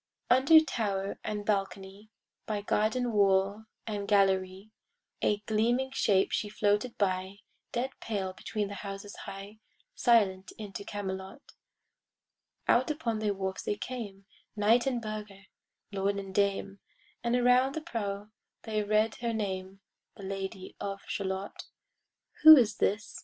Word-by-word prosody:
Under 270 +6 +8
tower 200 -9 -2
and 210 -1 -4
balcony, 195 0 -3 0.4
By 210 -2 -2
garden 230 +4 +1
wall 200 0 +2 0.2
and 205 -2 -4
gallery, 195 0 +2 0.5
A 205 0 +1
gleaming 235 +5 +1
shape 200 -7 +2
she 210 - -1
floated 210 +3 0
by, 190 0 -1 0.3
Dead 250 +2 -1
pale 195 -4 -3
between 210 +2 -3
the 200 - -7
houses 200 0 -7
high, 200 +2 -9 0.3
Silent 200 - +2
into 205 -2 -7
Camelot. 195 +5 -6 1.2
Out 255 +4 +4
upon 245 -8 -2
the 215 -1 0
wharfs 190 -1 -3
they 205 - -2
came, 205 -4 -7 0.3
Knight 225 +5 +3
and 245 -3 -1
burgher, 210 -2 -6 0.5
lord 200 0 0
and 195 -1 -6
dame, 200 0 0 0.4
And 235 0 +1
around 250 +2 +4
the 315 - -3
prow 210 -8 -4 0.3
they 215 -2 -1
read 215 +1 +2
her 235 -1 -2
name, 190 -2 -4 0.4
The 200 - -10
Lady 190 -1 -5
of 195 0 -4
Shalott. 190 0 -4 0.8
Who 315 0 +12
is 235 -5 +2
this? 210 +3 -1
205 Hz, 130 wpm, -30 LUFS, 195-225 Hz, 1.2 s, Who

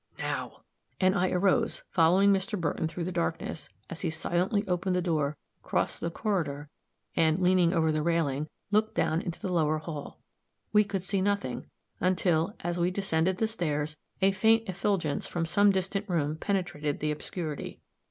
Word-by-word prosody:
"Now," - - -4 0.4
and 185 0 +4
I 185 -1 +2
arose, 185 +1 +1
following 185 +4 +5
Mr. 195 +1 -1
Burton 160 0 -1
through 170 +2 -4
the 180 - -3
darkness, 165 -2 -3 0.2
as 170 - -7
he 170 - 0
silently 180 +6 0
opened 180 +1 0
the - - +2
door, 155 -4 0 0.2
crossed - - -1
the 170 - -1
corridor, 160 -7 -2 0.5
and, 160 0 +3
leaning 180 -2 +4
over 160 -3 +2
the 155 0 0
railing, 155 -3 0 0.2
looked 215 +1 +2
down 160 +2 +1
into 170 - -5
the 185 - -3
lower 155 -3 +2
hall. 155 -2 -7 0.5
We 210 0 +6
could 195 -3 -3
see 195 0 0
nothing, 200 +1 -1 0.3
until, 180 0 +1
as 175 +1 -2
we 175 +1 +3
descended 185 -1 0
the 220 - +1
stairs, 155 -8 -2 0.3
a 195 - +6
faint 220 +3 +3
effulgence 185 -5 -1
from 170 -1 -2
some 205 +5 +4
distant 195 +2 -1
room 155 -4 0
penetrated 175 -5 -2
the 150 0 0
obscurity. 155 0 -5
175 Hz, 165 wpm, -29 LUFS, 160-195 Hz, 0.5 s, We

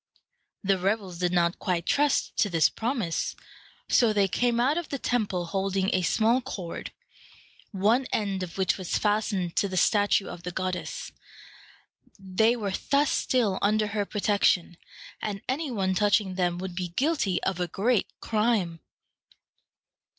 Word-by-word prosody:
The 195 -1 +2
rebels 190 -2 -1
did 180 -1 +1
not 175 -1 +1
quite 175 -3 -1
trust 290 -1 +1
to 205 - +2
this 165 -4 +4
promise, 225 -8 -2 0.5
so 235 -3 +4
they 200 -2 +3
came 235 +4 +1
out 265 +5 +3
of 345 -2 -3
the 280 - -2
temple 210 -9 -1
holding 195 +2 -1
a 185 - +2
small 225 +8 +2
cord, 180 -8 -6 0.8
one 220 +6 +2
end 200 -3 -1
of 180 -1 -6
which 190 0 +1
was 185 - -1
fastened 205 -4 0
to 200 - +3
the 185 -1 -4
statue 205 +1 +3
of 170 - -8
the 180 - -5
goddess. 185 0 -4 1.1
They 195 +4 +2
were 205 -5 -3 0.2
thus 285 +1 +3
still 225 -7 +1
under 215 +1 +2
her 205 -1 -2
protection, 200 -4 +1 0.5
and 200 -2 -4
any 280 +4 -1
one 195 -6 0
touching 205 0 +2
them 175 -2 0
would 185 0 -5
be 180 0 -3
guilty 235 - 0
of 190 -2 -1
a 180 - 0
great 215 +6 +1
crime. 210 -7 0
200 Hz, 150 wpm, -27 LUFS, 185-225 Hz, 1.1 s, this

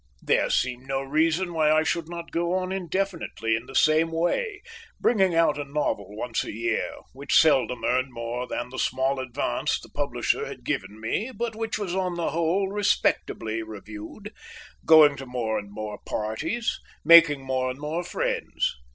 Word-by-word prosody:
There - - +2
seemed 130 +1 -1
no 135 0 -1
reason 160 +5 +1
why 155 -2 +3
I 155 0 +4
should 165 0 -1
not 170 -1 -7
go 170 +1 0
on 185 0 -2
indefinitely 180 -10 -2
in 115 +2 -5
the 135 - -10
same 160 +3 +4
way, 410 - -1 0.4
bringing 190 -7 +3
out 165 -3 +3
a - - -1
novel 120 -8 -3
once 115 +1 -2
a - - -6
year 115 +1 -1 0.2
(which 140 +2 +1
seldom 135 -5 +3
earned 130 +1 +1
more 120 +1 -4
than 120 0 -4
the 130 - -6
small 130 +1 0
advance 125 - -1
the - - -14
publisher - - -1
had - - -9
given 100 +3 -3
me 150 - -2
but 235 -1 -4
which 225 0 -2
was 200 -4 -3
on 185 -2 -1
the 170 -1 -1
whole 170 +4 +1
respectably 195 - 0
reviewed), 110 - -9 0.5
going 155 -3 +7
to 135 0 -8
more 115 -3 -1
and 100 -1 -10
more 105 0 -6
parties, 110 - -2 0.3
making 165 -5 +7
more 130 -1 -1
and 130 +2 -6
more 155 +4 -3
friends. 175 - -1
150 Hz, 170 wpm, -26 LUFS, 125-175 Hz, 0.5 s, going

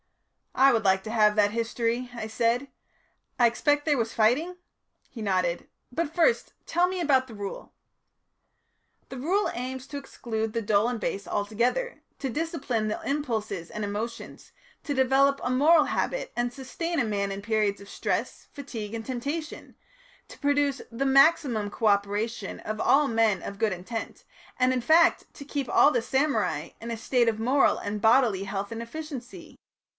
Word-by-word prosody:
"I 270 0 +6
would 225 -1 +1
like 190 0 +3
to 220 - -6
have 210 -2 +4
that 205 -1 +3
history," 230 +2 -1
I 235 -2 -5
said. 230 +4 0 0.7
"I 240 - +6
expect 290 +5 +1
there 295 -3 +2
was 225 -1 -1
fighting?" 265 +11 +2 0.5
He 230 - -9
nodded. 185 -4 -1 0.2
"But 310 +3 -2
first 360 +8 +2
tell 350 +2 +2
me 370 0 -3
about 270 -6 +2
the 225 - -11
Rule." 200 -1 -7 1.4
"The 265 - -7
Rule 370 +11 +1
aims 255 +1 -5
to 285 - -6
exclude 225 -5 -4
the 230 - -1
dull 210 +2 +2
and 245 -2 -3
base 200 -1 -3
altogether, 235 - -1 0.2
to 270 - -2
discipline 270 -7 -2
the 215 - -2
impulses 220 - -2
and 215 - -5
emotions, 215 +3 -6 0.3
to 290 - -2
develop 270 +1 +3
a 250 - -1
moral 300 +5 +5
habit - - -2
and 240 0 -1
sustain 320 +6 -4
a 245 - +2
man 200 -2 -1
in 195 0 -5
periods 210 -2 0
of 200 - -12
stress, - - -3
fatigue, 230 -7 -7
and 225 -1 -6
temptation, 285 +5 -5 0.5
to - - -14
produce 285 -1 +1
the 230 +4 -2
maximum 270 -6 +4
co 225 - -4
operation 205 +1 0
of 215 0 -4
all 285 +1 +4
men 225 -6 +2
of 200 - -7
good 220 -2 +2
intent, 190 +6 -6 0.3
and, 255 0 +3
in 250 - 0
fact, 320 +7 +4
to 280 - -10
keep 280 -3 -3
all 290 - +5
the 245 - +1
samurai 225 - 0
in 230 - -6
a 230 - -3
state 240 +1 +2
of 220 -1 -3
moral 260 +5 +3
and 205 0 -4
bodily 225 -4 +4
health 200 +1 -4
and 230 0 -5
efficiency. 260 0 -8
240 Hz, 170 wpm, -27 LUFS, 215-280 Hz, 1.4 s, I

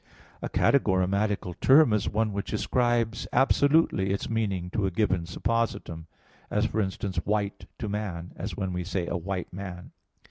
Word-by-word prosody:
A - - -3
categorematical 100 -5 +2
term 135 -3 +6
is 105 -2 +1
one 110 0 0
which 100 0 -4
ascribes 120 -2 +1
absolutely 140 -7 +3
its 100 +3 -2
meaning 100 -6 -1
to 105 -2 0
a - - +1
given 95 -2 0
suppositum; 95 -5 -2 0.4
as, 105 +1 +1
for 110 -1 0
instance, 95 -1 -3
"white" 100 +3 -1
to 110 - -4
man, 100 -5 -4
as 95 -3 -5
when 95 -2 -2
we 90 0 -2
say 90 -1 -2
a - - -3
"white 90 +1 -4
man." 90 -2 -7
100 Hz, 155 wpm, -27 LUFS, 90-110 Hz, 0.4 s, term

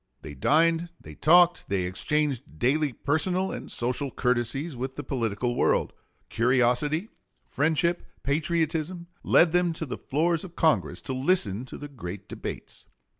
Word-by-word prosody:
They 75 - -8
dined, 165 - +2
they - - -12
talked, 175 +2 +4
they 95 -2 0
exchanged 130 - -1
daily 145 - +1
personal 180 +9 -1
and - - -7
social 125 +4 -2
courtesies 125 +5 -1
with 130 +2 -5
the 145 - -5
political 120 -3 -1
world. - - +1 0.3
Curiosity, 125 - +1 0.4
friendship, 160 +4 +1 0.2
patriotism, 160 +3 -1 0.2
led 170 -1 +4
them 175 -1 +2
to 160 - -5
the 130 - -6
floors 165 +3 0
of 175 -3 -10
Congress 160 -2 +1
to 130 - -4
listen 130 - +1
to - - -9
the 145 - -7
great 100 -8 -8
debates. - - -8
145 Hz, 140 wpm, -26 LUFS, 125-165 Hz, 0.4 s, talked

